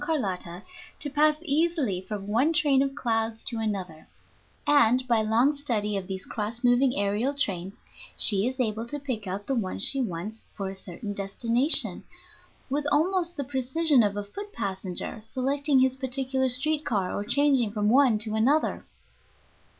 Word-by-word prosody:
Carlotta 195 - -4 0.4
to 290 - -4
pass 300 +1 +2
easily 300 - 0
from 195 +1 -7
one 235 +10 +1
train 295 -5 +3
of 275 0 -2
clouds 225 -2 -2
to 230 - -2
another, 190 -7 -5 0.6
and, 255 -3 +4
by 230 -3 +2
long 235 +7 +2
study 220 -8 -2
of 190 -2 -4
these 190 -1 -6
cross 225 +3 -6
moving 245 +2 +3
aërial 210 +8 -1
trains, 190 -6 -3 0.4
she 200 +1 +4
is 260 +1 -5
able 225 -1 -2
to 290 - -5
pick 255 -8 -6
out 195 +2 -5
the 275 - -2
one 215 -7 -3
she 270 +7 +3
wants 215 +1 -6
for 195 -1 -5
a - - -10
certain 190 +2 -8
destination 230 +8 +5 0.6
with 290 +2 -2
almost 345 +3 0
the 285 - -2
precision 265 +2 +1
of 205 -2 0
a 205 - -3
foot 405 - -9
passenger 190 - -5
selecting 270 +5 -1
his 260 0 +2
particular 265 0 -2
street 295 +5 +1
car 200 -5 -2
or 205 - -3
changing 260 -1 +2
from 210 -1 -2
one 250 -1 +4
to 215 0 -2
another. 260 +8 +1
240 Hz, 165 wpm, -26 LUFS, 205-280 Hz, 0.6 s, destination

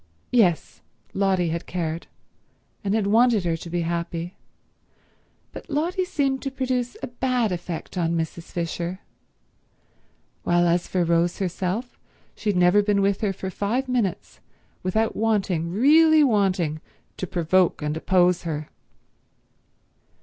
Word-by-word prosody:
Yes; 190 -10 +2 0.3
Lotty 190 -3 +1
had 170 +1 -4
cared, 165 -2 -3 0.8
and 200 +1 0
had 220 -3 +1
wanted 225 0 +4
her 165 -1 +1
to 170 - -9
be 175 +1 -1
happy; 170 +1 -3 1.2
but - - -10
Lotty 345 +6 0
seemed 275 -6 -1
to 275 - -3
produce 255 -2 -2
a - - -2
bad 245 -3 0
effect 175 0 -5
on 170 0 0
Mrs. 165 +1 -4
Fisher, 175 +2 -4 1.4
while 175 0 +2
as 170 +1 +1
for 180 -2 0
Rose 170 +1 +1
herself 190 +6 -3 0.3
she 215 - -3
had 200 - +1
never 180 +3 +5
been 200 -1 +1
with 200 0 +1
her 210 -3 +1
for 190 0 -5
five 235 +8 -1
minutes 235 -8 -2 0.4
without 220 +5 0
wanting, 195 -7 0
really 310 - +5
wanting, 190 - +1 0.4
to 185 - -4
provoke 175 -1 +1
and 150 0 -1
oppose 180 +1 +2
her. 155 -3 -4
185 Hz, 135 wpm, -24 LUFS, 170-225 Hz, 1.4 s, never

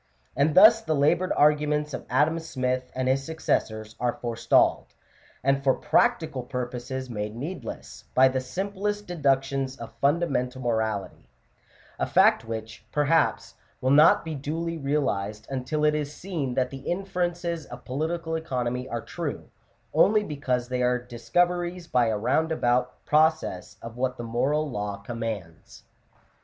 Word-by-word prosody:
And 145 +3 +2
thus 220 +4 +8
the 160 -8 -1
laboured 170 +6 +2
arguments 150 0 +2
of - - -6
Adam 150 +6 +2
Smith 130 -5 -2
and 130 0 -1
his 135 +1 +2
successors 110 -8 -2
are 120 -1 +1
forestalled, 115 -2 +1 0.5
and 135 +1 +2
for 135 -1 +3
prac 240 0 +3
tical 140 -7 -6
purposes 125 +1 -4
made 105 -2 -4
needless, 155 +10 -7
by 130 +1 +7
the 130 0 -1
simplest 200 +8 -3
deductions 135 -5 0
of 115 -1 -9
fundamental 140 -4 +1
morality: 110 -4 -2 0.7
a - - 0
fact - - +4
which, 110 0 -6
perhaps, 150 +2 +1 0.3
will 130 - +1
not 150 +4 +6
be 160 - -4
duly 160 +4 -3
realized 115 -9 -1
until 135 +4 -1
it 150 - +4
is 150 -1 -2
seen 150 -7 -4
that 125 -1 0
the 135 - -6
inferences 175 0 -2
of - - -10
political 160 +5 -2
economy 125 -5 -2
are 115 - -3
true, - - -6 0.4
only 215 0 +4
because 130 -7 -2
they 125 0 -2
are 125 0 +2
discoveries 175 +9 -1
by 125 -7 +2
a 110 -1 0
roundabout 125 0 0
pro 155 +1 +6
cess 105 - -8
of 115 +1 -8
what 130 0 -1
the 120 - -5
moral 135 +7 0
law 105 -5 -4
commands. 105 -6 -6
135 Hz, 145 wpm, -26 LUFS, 125-160 Hz, 0.7 s, thus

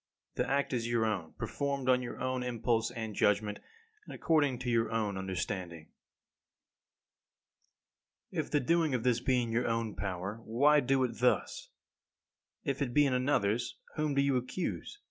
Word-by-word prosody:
The - - -1
act 140 0 +1
is 120 -1 -1
your 115 -1 +2
own, 95 -7 -2
performed 140 -2 -3
on 125 -1 +4
your 120 - -6
own 130 0 -1
impulse 115 -2 0
and 115 -3 -5
judgment, 105 +1 +1 0.4
and - - -9
according 145 -6 +2
to 125 - -2
your 115 -1 +2
own 110 -3 0
understanding. 90 -3 -4 2.4
17. - - -3
If - - -16
the 145 - +2
doing 165 0 +2
of 120 - -2
this 125 -2 +2
be 125 0 +2
in 115 - -4
your 120 +2 +1
own 115 -2 -1
power, 95 +3 -4
why 145 +7 +4
do 135 0 +2
it 125 -2 -3
thus? 315 - +1 0.9
If 140 -3 -2
it 125 -3 -1
be 145 - +6
in 135 - +1
another's, 120 -4 +1 0.2
whom 150 -2 0
do 140 - +4
you 140 -2 +2
accuse? 150 - -4
125 Hz, 165 wpm, -32 LUFS, 110-135 Hz, 2.4 s, be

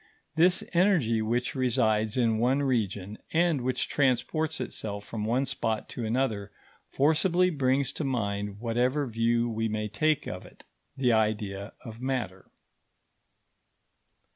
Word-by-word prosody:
This 175 +3 +4
energy, 170 - +3
which 120 +3 -1
resides 110 -4 +1
in 115 -3 +2
one 130 +4 +2
region, 105 -6 -1
and 165 -4 +2
which 125 0 -1
transports 145 +4 0
itself 100 -1 -5
from 110 -2 -4
one 125 +5 +1
spot 110 -4 -2
to 120 - -5
another, 110 -3 -1 0.4
forcibly 170 +5 +3
brings 135 -2 +1
to - - -4
mind, 105 -6 -2
whatever 125 +5 0
view 115 0 +1
we 110 -1 -1
may 105 0 -2
take 155 +7 0
of 90 - -5
it, - - -16 0.3
the 125 -3 +3
idea 105 -2 -1
of 115 0 -9
matter. 125 -8 -3
120 Hz, 130 wpm, -28 LUFS, 110-135 Hz, 0.4 s, This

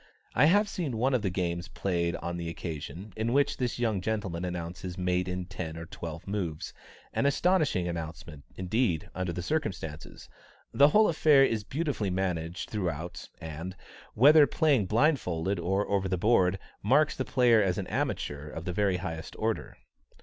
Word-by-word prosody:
I 125 - +5
have 205 +7 +4
seen 160 - -3
one 130 +4 +2
of 125 - +2
the 100 - 0
games 85 -1 -2
played 85 -1 -1
on 85 0 -4
the 85 -1 -4
occasion, 85 +4 -6
in 110 +2 -1
which 140 +1 +2
this 125 -2 -1
young 110 -5 0
gentleman 100 -5 -2
announces 90 0 -5
mate 90 0 0
in 90 0 -3
ten 80 -3 -6
or 85 - -6
twelve 85 0 -7
moves 90 -7 -3 0.4
an 140 - +2
astonishing 150 - +2
announcement, 80 -3 -6
indeed, 95 - 0
under 95 -1 -2
the 90 +1 -4
circumstances. 90 - -4 0.5
The 140 - +7
whole 215 +8 +5
affair 150 -4 +5
is 110 -4 -1
beautifully 135 - -2
managed 90 -2 -2
throughout, 85 -4 -4
and, 80 +4 -6 0.4
whether 145 +5 +7
played 140 - +2
blindfolded 100 - +1
or 95 +4 0
over 100 -1 0
the 95 - 0
board, 95 -2 +3 0.2
marks 140 +8 +3
the 130 - -1
player 120 -4 +4
as 95 -3 +1
an 100 - -2
amateur 75 -3 -3
of 80 +2 -7
the 90 - -2
very 100 -1 +1
highest 85 -3 -6
order. 110 0 -2
95 Hz, 165 wpm, -29 LUFS, 85-120 Hz, 0.5 s, The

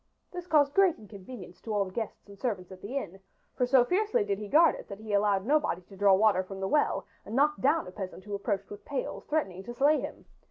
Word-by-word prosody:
This 355 -1 -7
caused 290 -4 +4
great 385 -2 +4
inconvenience 200 -2 -11
to 225 - -6
all 200 -1 +2
the 185 - -9
guests 220 +1 -5
and 200 - -12
servants 195 -5 -3
at 185 0 -11
the 245 +7 -4
inn, 195 -7 -5 0.4
for 250 - +1
so 250 -1 +5
fiercely 425 - +1
did 200 - -1
he 210 - -6
guard 320 +8 +6
it - - -9
that 200 - -7
he 215 -1 -6
allowed 200 -1 +2
nobody 290 - +1
to 195 - -15
draw 195 0 +5
water 205 -1 +4
from 190 +1 -8
the 190 - -1
well 295 +7 +1 0.2
and 220 - -7
knocked 300 +3 +2
down 310 +5 +3
a 180 - -9
peasant 190 -1 -7
who 205 +1 -7
approached 200 -1 -2
with 205 - -9
pails, 280 -2 -4
threatening 195 - -1
to 240 +4 -8
slay 290 +5 +4
him. - - -7
215 Hz, 245 wpm, -29 LUFS, 195-285 Hz, 0.4 s, guard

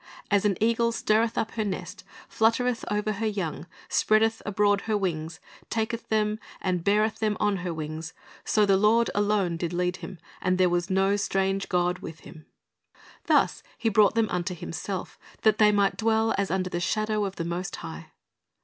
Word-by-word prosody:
As 200 0 +3
an 200 -3 +2
eagle 230 +1 +2
stirreth 225 0 +1
up 220 - -1
her 220 - -2
nest, 200 -3 -5 0.2
fluttereth 230 +2 +1
over 210 +1 0
her 215 +2 -2
young, 180 -6 -3 0.2
spreadeth 225 +1 +2
abroad 205 -1 +2
her 215 - +2
wings, 160 -4 -3 0.3
taketh 225 +1 -2
them, 215 0 +1 0.2
beareth 200 +4 +1
them 215 -1 0
on 205 -1 +1
her 180 -1 -4
wings: 160 +1 -6 0.3
so 210 -1 +3
the 195 -1 +4
Lord 225 +4 +3
alone 205 -4 +1
did 170 0 -3
lead 180 +1 0
him, 185 - -8 0.2
and 185 0 +1
there 185 -1 +4
was 175 +1 0
no 195 +1 +2
strange 195 -1 0
god 180 0 +1
with 160 0 -9
him."^ 155 -3 -13 0.8
Thus - - +3 0.2
He 225 - +1
brought 215 +1 +4
them 225 -1 +3
unto 180 +1 -2
Himself, 180 +3 -5 0.2
that 215 -1 +4
they 210 -1 +6
might 200 -1 +2
dwell 225 0 +2
as 200 -1 -1
under 185 0 -1
the 175 - -1
shadow 215 +3 0
of 195 -1 -5
the 165 - -4
Most 175 +2 -3
High. 80 0 -8
200 Hz, 175 wpm, -26 LUFS, 180-215 Hz, 0.8 s, they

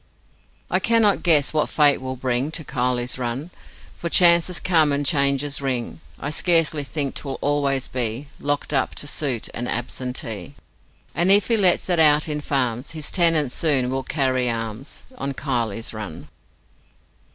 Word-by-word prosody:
I - - +3
cannot 225 -3 +2
guess 155 -5 +4
what 155 - 0
fate 145 -2 +3
will 130 0 -5
bring 130 +2 -1
To 160 - -3
Kiley's 125 -1 -1
Run 130 +7 -4 0.5
For 170 - -4
chances 170 0 +5
come 160 -5 +3
and 140 0 -1
changes 140 0 +1
ring 130 +1 -3 0.2
I 145 - -4
scarcely 160 -3 +3
think 140 -1 -3
'twill 135 -2 -5
always 140 -2 -1
be 125 +2 -3
Locked 145 0 -2
up - - -1
to - - -4
suit 140 -5 -1
an 120 +1 -4
absentee; 120 -2 -5 0.6
And 175 +2 0
if 205 +3 +5
he 230 - +3
lets 190 -5 +2
it 175 -2 +1
out 150 -1 +5
in 150 -1 -4
farms 130 -1 -2
His 150 - -1
tenants 165 -7 +3
soon 135 -6 +1
will 135 0 -2
carry 130 -2 -1
arms 115 +3 -5 0.2
On 140 - -3
Kiley's 115 -6 -3
Run. 105 -7 -8
140 Hz, 155 wpm, -21 LUFS, 125-155 Hz, 0.6 s, chances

